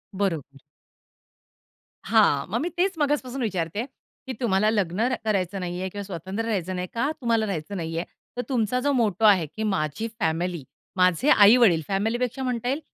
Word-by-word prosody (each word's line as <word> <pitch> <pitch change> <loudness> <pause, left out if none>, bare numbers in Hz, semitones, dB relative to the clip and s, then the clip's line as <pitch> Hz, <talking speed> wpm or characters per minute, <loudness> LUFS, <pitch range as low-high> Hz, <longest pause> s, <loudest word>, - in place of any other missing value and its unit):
बरोबर. 185 -8 0 1.6
हां, 200 -10 +3
मग 230 +4 -1
मी 340 - -1
तेच 380 +2 +2
मगासपासून 275 -3 -1
विचारते, 195 0 -2 0.4
की 260 - -3
तुम्हाला 215 -3 +2
लग्न 190 -3 -1
र 255 - +1
करायचं 195 -3 0
नाहीये 180 +1 -3
किंवा 205 +2 -6
स्वतंत्र 190 +3 -5
राहायचं 190 -5 -2
नाहीये. 180 0 -3
का, 250 +6 0
तुम्हाला 230 -2 +1
राहायचं 195 0 -4
नाहीये? 165 0 -3 0.3
तर - - 0
तुमचा 245 -1 +1
जो 285 +3 +1
मोटो 220 -4 +1
आहे 195 -6 +5
की 220 - -3
माझी 190 0 -1
फॅमिली, 170 -2 -1 0.3
माझे 185 - +3
आई-वडील, 210 - +6
फॅमिलीपेक्षा 235 +6 -1
म्हणता 245 -2 -2
येईल, 280 +4 -1
205 Hz, 160 wpm, -25 LUFS, 180-235 Hz, 1.6 s, आई-वडील